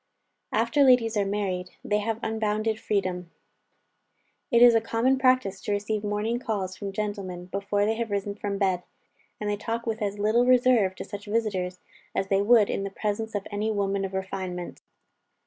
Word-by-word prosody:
After 290 - +2
ladies 250 -4 +5
are 200 -1 +1
married, 190 -3 -2
they 210 0 +1
have 225 +1 -2
unbounded 220 0 -1
freedom. 185 -4 -2 1.2
It 235 -2 +6
is 240 -1 +9
a 225 - +4
common 240 +4 +1
practice 255 -7 +2
to - - -3
receive 205 +1 -1
morning 210 +3 -1
calls 195 -6 -3
from 195 +1 -5
gentlemen, 195 -3 -4
before 200 +2 -1
they 220 - +2
have 230 -1 -2
risen 200 0 -2
from 200 -1 -3
bed; 190 -3 +1 0.6
and 210 - -3
they 205 0 0
talk 230 +2 -3
with 225 -1 -3
as 205 0 -2
little 220 +4 +2
reserve 245 -6 +4
to - - -7
such 205 +1 -8
visiters, 200 -5 -1 0.3
as 195 - -1
they 195 0 +3
would 215 0 +5
in - - -2
the 195 - -3
presence 215 +2 -3
of 200 - -2
any 210 +2 -1
woman 200 -2 0
of 190 0 -4
refinement. 185 -2 -5
205 Hz, 180 wpm, -26 LUFS, 195-225 Hz, 1.2 s, is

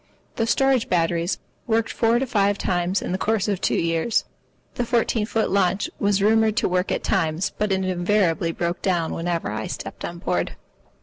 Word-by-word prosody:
The 225 - +1
storage 270 0 +2
batteries 170 0 +1 0.3
worked 225 -1 +1
four 230 0 +2
or 255 +3 +2
five 205 -5 +1
times 180 0 0
in - - -3
the 185 - -1
course 220 0 +1
of 200 -3 -1
two - - +1
years. 165 +7 +1 0.5
The 245 - -1
fourteen 230 -2 +1
foot 225 -1 0
launch 195 0 +1
was 200 -1 +2
rumoured 220 0 +3
to - - +2
work 180 +1 0
at - - -1
times, 160 +3 0
but 210 -1 0
it 190 0 +1
invariably 175 -2 +1
broke 170 +1 -3
down 175 -4 0
whenever 170 -8 -2
I 110 0 -3
stepped - - -7
on - - -5
board. - - -2
195 Hz, 185 wpm, -23 LUFS, 175-220 Hz, 0.5 s, rumoured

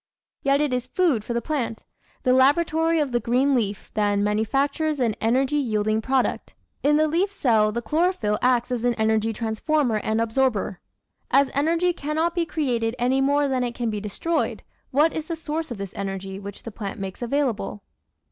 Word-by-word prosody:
Yet 275 +1 +2
it 295 -3 0
is 250 0 -2
food 295 - +1
for 235 - -4
the 235 - -1
plant! 245 -7 -3 0.4
The 255 - +3
laboratory 320 +5 +3
of 290 -4 0
the 240 - +2
green 250 +5 +2
leaf, 210 -5 -1
then, 205 -1 +1
manufactures 275 +8 0
an 230 -4 +1
energy 260 +6 +2
yielding 215 -5 0
product. 260 +2 -1 0.3
In 295 +1 +3
the 310 0 +3
leaf 345 +6 +1
cell 225 - +2
the 235 +2 -3
chlorophyll 300 - +1
acts 250 -1 +2
as 240 -2 -1
an 245 -1 +2
energy 220 0 +1
transformer 230 +3 0
and 220 +1 -1
absorber. 225 -4 0 0.5
As 275 0 +3
energy 330 +5 +2
cannot 315 +3 -1
be 340 -2 -1
created 245 -8 -1
any 255 +2 +2
more 285 +1 +2
than 260 -2 0
it 240 -1 -3
can 235 -2 -1
be 210 - -3
destroyed, 315 +11 -2 0.3
what 300 +4 +3
is 315 -1 -4
the 335 - -2
source 320 0 -4
of 240 - -5
this 195 -2 -6
energy 195 -1 -5
which 200 0 -9
the 230 - -7
plant 205 -2 -6
makes 195 +2 -6
available? 240 -5 -1
250 Hz, 185 wpm, -24 LUFS, 220-295 Hz, 0.5 s, The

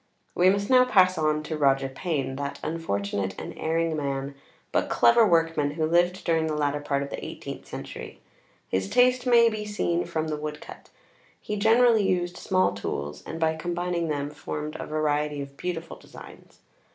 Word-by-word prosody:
We 180 +1 +4
must 200 +1 +1
now 255 -1 +6
|xviii| 250 - -5
pass 185 -2 +6
on 155 0 +1
to 155 - -4
Roger 135 -1 +3
Payne, 135 -1 -3
that 140 0 -4
unfortunate 100 - -2
and - - -7
erring 165 0 0
man 140 -1 -3 0.4
but - - 0
clever 235 -1 +5
workman, 165 -4 +1
who 160 -1 0
lived 175 +3 +2
during 165 -1 +1
the 155 - -2
latter 145 -1 0
part 140 -1 -1
of 140 - -8
the - - -5
eighteenth - - -8
century. - - -8 0.5
His 95 +1 -1
taste 250 0 +3
may 235 -1 +6
be 215 -2 -2
seen 190 -5 -1
from 160 -2 -2
the 150 - -2
woodcut. 150 0 -8 0.5
He 210 - -4
generally 225 +2 +4
used 180 -2 0
small 185 -1 +1
tools, 75 -7 -5
and 165 - -5
by 160 -1 +1
combining 175 +1 -2
them 145 -1 -2
formed 150 +1 -6
a - - -5
variety 150 -1 0
of 140 0 -7
beautiful 170 0 -5
designs. - - -15
160 Hz, 175 wpm, -26 LUFS, 145-180 Hz, 0.5 s, now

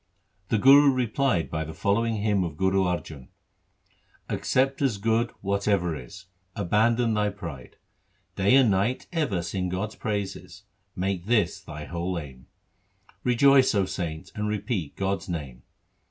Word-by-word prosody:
The 110 - +2
Guru 140 +5 +7
replied 125 - 0
by 80 -1 -2
the 80 0 -8
following 110 +7 +1
hymn 105 -2 +1
of 80 -4 -5
Guru 95 +1 +2
Arjan: 80 -6 -4 0.5
— - - -37
Accept 135 +2 0
as 130 -7 +1
good 115 +3 +1
whatever 100 -4 0
is; 75 +8 -10 0.3
Abandon 115 +5 +2
thy 105 -1 +1
pride; 85 -10 -9 0.6
Day 100 +6 +4
and 130 -5 +5
night 100 +7 0
ever 125 - 0
sing 90 +2 -3
God's 100 +4 -3
praises: 100 -2 -5 0.3
Make 95 -1 -2
this 115 -3 +2
thy 75 0 -8
whole 85 +2 -3
aim. 65 -6 -9 0.8
Rejoice, 130 +2 +5
0 100 -2 +2
saint, 85 -4 -5
and 105 -1 -3
repeat 105 - -3
God's 95 0 -2
name. 70 -7 -5
100 Hz, 140 wpm, -26 LUFS, 85-115 Hz, 0.8 s, Guru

